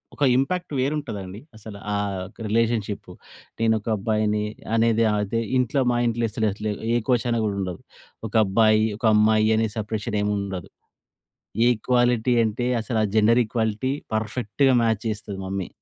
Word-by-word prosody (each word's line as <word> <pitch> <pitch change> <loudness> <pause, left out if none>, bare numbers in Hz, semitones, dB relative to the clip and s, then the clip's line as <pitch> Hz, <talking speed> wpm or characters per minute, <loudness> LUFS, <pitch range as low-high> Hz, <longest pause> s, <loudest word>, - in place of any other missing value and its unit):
ఒక - - -2
ఇంపాక్ట్ 175 +6 -1
వేరుంటదండి. 115 -9 -3 0.2
అసలు 105 -1 -10 0.2
ఆహ్, 100 -1 -1
యొక్క 105 +5 -13
రిలేషన్‌షిప్పు. 115 -2 -1 0.5
నేనొక 110 -1 +1
అబ్బాయిని 105 +1 0 0.3
అనేది 115 0 +3
అదే 105 +2 -1 0.2
ఇంట్లో 130 +2 +1
మా 120 - +1
ఇంట్లో 115 0 0
అసలు 110 +1 0
అట్లా 105 +1 -3 0.2
ఏ - - +3
కోశాన 120 -1 +2
గూడా 105 -2 -1
ఉండదు. 90 -3 -5 0.5
ఒకబ్బాయి, 110 0 +3
ఒకమ్మాయి 110 -1 +3
అనే 110 0 +2
సెపరేషనేమి 105 -1 -2
ఉండదు. 95 -3 -5 1.0
ఈక్వాలిటీ 120 0 +2
అంటే 115 +3 -2
అసలా 115 0 -1 0.2
జెండర్ 115 +3 +5
ఈక్వాలిటీ 110 +3 -1 0.2
పర్ఫెక్ట్‌గా 120 +4 0
మ్యాచ్ 110 -2 0
చేస్తది 105 -2 -5
మమ్మీ. 95 -1 -3
110 Hz, 130 wpm, -24 LUFS, 105-120 Hz, 1.0 s, జెండర్